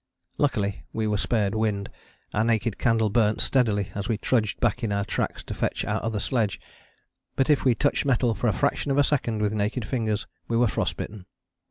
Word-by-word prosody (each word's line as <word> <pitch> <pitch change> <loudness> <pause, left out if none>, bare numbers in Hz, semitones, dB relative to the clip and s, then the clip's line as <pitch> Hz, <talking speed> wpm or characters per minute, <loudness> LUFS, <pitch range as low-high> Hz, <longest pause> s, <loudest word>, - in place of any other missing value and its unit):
Luckily 100 -8 0
we 110 - -1
were 105 -1 +1
spared 105 -3 +1
wind. 105 -2 0 0.5
Our 105 - +2
naked 115 -2 0
candle 110 -3 +2
burnt 110 -1 +2
steadily 105 -7 +1
as 100 +2 -4
we 110 - +1
trudged 110 -2 0
back 120 +1 +1
in 110 - 0
our 100 0 0
tracks - - -2
to - - -6
fetch - - -1
our - - -1
other 110 -2 -1
sledge, 110 -3 0 0.8
but 135 +3 +3
if 145 - +3
we 125 -3 +4
touched - - +1
metal 125 -3 +2
for 120 - -1
a - - +4
fraction 140 0 0
of 135 - +1
a 145 - +6
second 120 -7 0
with 105 0 +1
naked 105 +3 -1
fingers 110 -5 -1 0.2
we 115 - 0
were 120 0 +4
frost - - -1
bitten. 100 -3 -7
110 Hz, 205 wpm, -26 LUFS, 105-120 Hz, 0.8 s, a